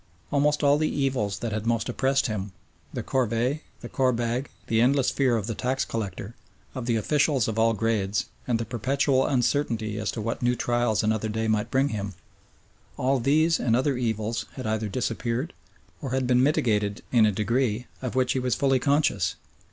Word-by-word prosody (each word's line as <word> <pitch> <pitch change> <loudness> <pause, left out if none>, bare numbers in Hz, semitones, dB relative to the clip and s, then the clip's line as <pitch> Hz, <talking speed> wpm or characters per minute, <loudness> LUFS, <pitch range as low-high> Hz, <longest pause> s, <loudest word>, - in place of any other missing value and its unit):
Almost 150 +1 +2
all 145 +1 +4
the 155 - +1
evils 130 -8 -1
that 115 - -2
had 110 +1 -3
most 115 -1 +1
oppressed 135 +3 +1
him, 105 -5 -3 0.4
the - - -4
corvée, 125 +2 0 0.2
the 120 - -6
korbag, 125 0 0 0.2
the 115 0 +2
endless 135 +2 +3
fear 130 -4 +2
of 105 - -3
the 115 - -3
tax 130 +4 -1
collector, 100 -1 -5 0.4
of 125 -2 -5
the 120 - +2
officials 140 +2 +2
of 110 0 -2
all 115 0 +4
grades, 105 -2 0 0.2
and 120 -2 +2
the 115 - -3
perpetual 130 +3 +1
uncertainty 120 -5 0
as 110 -2 -2
to - - -4
what 115 +2 -3
new 120 0 +2
trials 120 -3 +1
another 110 0 0
day 110 +1 -1
might 110 +1 0
bring 135 +2 +2
him 100 -5 -4 0.8
all 130 +1 +1
these 155 +6 +3
and 115 -2 +2
other 130 +2 +1
evils 115 -1 -2
had 130 - -7
either 110 0 -1
disappeared 125 - -2 0.5
or 135 - -4
had 130 -1 +1
been 125 0 +3
mitigated 105 -7 +1
in 115 -3 +5
a - - +2
degree, 115 +3 0 0.2
of 125 -2 -4
which 130 -1 +2
he 130 - 0
was 125 -2 0
fully 135 -2 +2
conscious. 145 +3 +1
120 Hz, 185 wpm, -26 LUFS, 110-135 Hz, 0.8 s, in